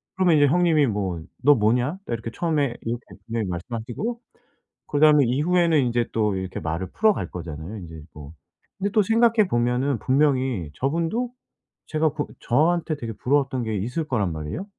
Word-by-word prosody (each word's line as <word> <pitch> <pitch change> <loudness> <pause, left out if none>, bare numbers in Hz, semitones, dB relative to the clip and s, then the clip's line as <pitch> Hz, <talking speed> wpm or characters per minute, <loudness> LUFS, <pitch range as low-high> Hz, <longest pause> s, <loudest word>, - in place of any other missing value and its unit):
그러면 185 -3 +3
이제 145 - +5
형님이 160 -1 +3
뭐 95 -5 -2 0.2
"너 145 +1 +7
뭐냐?" 120 - +1
딱 - - -4
이렇게 115 0 -4
처음에 150 -7 0
이렇게 120 +1 -4 0.2
분명히 115 -2 -2
말씀하시고 120 - -4 0.7
그다음에 150 -1 +5
이후에는 165 +5 +2
인제 120 -2 0
또 105 -3 +1
이렇게 95 -1 -4
말을 80 +3 -3
풀어갈 215 -1 +1
거잖아요. 85 +4 -7
인제 80 -3 -10
뭐. 75 0 -10 0.5
근데 200 +1 -1
또 215 - +4
생각해 225 +1 +3
보면은 125 +2 +1
분명히 130 - +1
저분도 170 - -1 0.5
제가 155 -1 0
그 150 -2 -1 0.2
저한테 160 +5 +1
되게 115 -5 -5
부러웠던 135 0 0
게 110 -2 -2
있을 125 - -2
거란 105 - 0
말이에요. 80 - -5
130 Hz, 375 characters per minute, -24 LUFS, 110-160 Hz, 0.7 s, 너